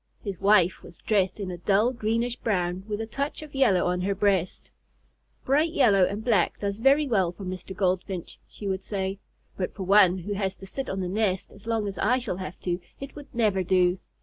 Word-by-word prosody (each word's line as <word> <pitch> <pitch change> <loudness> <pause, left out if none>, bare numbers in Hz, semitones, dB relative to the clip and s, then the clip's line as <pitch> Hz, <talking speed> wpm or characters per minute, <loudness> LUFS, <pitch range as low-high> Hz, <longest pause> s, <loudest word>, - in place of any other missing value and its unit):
His 195 -4 -5
wife 195 -3 +4
was - - -14
dressed 200 -2 0
in 190 -2 -4
a 175 - -7
dull, 205 +7 +2
greenish 230 +1 -1
brown 185 -6 -1
with 210 -1 -3
a - - -2
touch 280 +7 -3
of 300 - -12
yellow 230 -10 +3
on 180 0 0
her 195 +2 0
breast. 195 -3 0 0.7
"Bright 305 +5 +2
yellow 205 - +5
and 205 +3 -4
black 210 -8 +2
does 200 0 -3
very 275 +5 +4
well 190 -8 +2
for 195 - -11
Mr. 185 +1 -6
Goldfinch," 185 -1 -2
she 205 - -8
would 190 0 -1
say, 195 -1 -3 0.4
"but 180 - -3
for 195 - -5
one 190 -1 +5
who 190 +3 -4
has 190 -1 -2
to 195 - -11
sit 270 +8 -5
on 190 0 -2
the 180 - -2
nest 190 -1 -1
as 205 +2 -14
long 225 -2 0
as 195 -2 -5
I 250 - +3
shall 235 -8 -3
have 185 -3 -7
to, 175 -1 -1 0.2
it 275 0 -8
would 290 -1 -10
never 210 -5 +2
do. 180 0 +2
200 Hz, 215 wpm, -26 LUFS, 185-225 Hz, 0.7 s, yellow